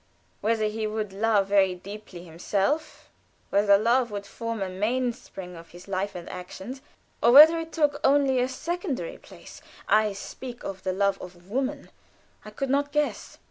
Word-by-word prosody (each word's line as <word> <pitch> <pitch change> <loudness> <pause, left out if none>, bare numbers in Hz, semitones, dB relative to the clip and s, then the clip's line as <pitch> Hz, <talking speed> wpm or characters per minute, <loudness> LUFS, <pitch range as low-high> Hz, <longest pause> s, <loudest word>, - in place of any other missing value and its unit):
Whether 220 0 +1
he 215 +1 -2
would 215 -2 -3
love 205 0 +2
very 195 -2 +3
deeply 195 -1 -10
himself, 195 - -2 0.4
whether 200 0 +5
love 235 +3 +2
would 205 -1 -5
form 230 0 -4
a - - -3
mainspring 210 -2 -3
of 165 0 -12
his 175 +2 -14
life 195 +1 -2
and 175 -1 -7
actions, 190 +8 -8 0.4
or 235 - +5
whether 310 +5 +9
it 325 0 -6
took 290 -2 +1
only 275 -2 +4
a 250 - +2
secondary 340 - -4
place - - -14 0.3
I 215 -1 +3
speak 240 +5 -8
of 190 -1 -6
the 185 - -1
love 195 +1 0
of 180 +1 -12
woman 270 +3 -2 0.5
I 215 - -9
could 260 +5 -3
not 285 +1 +1
guess. 300 0 -2
215 Hz, 165 wpm, -26 LUFS, 195-260 Hz, 0.5 s, whether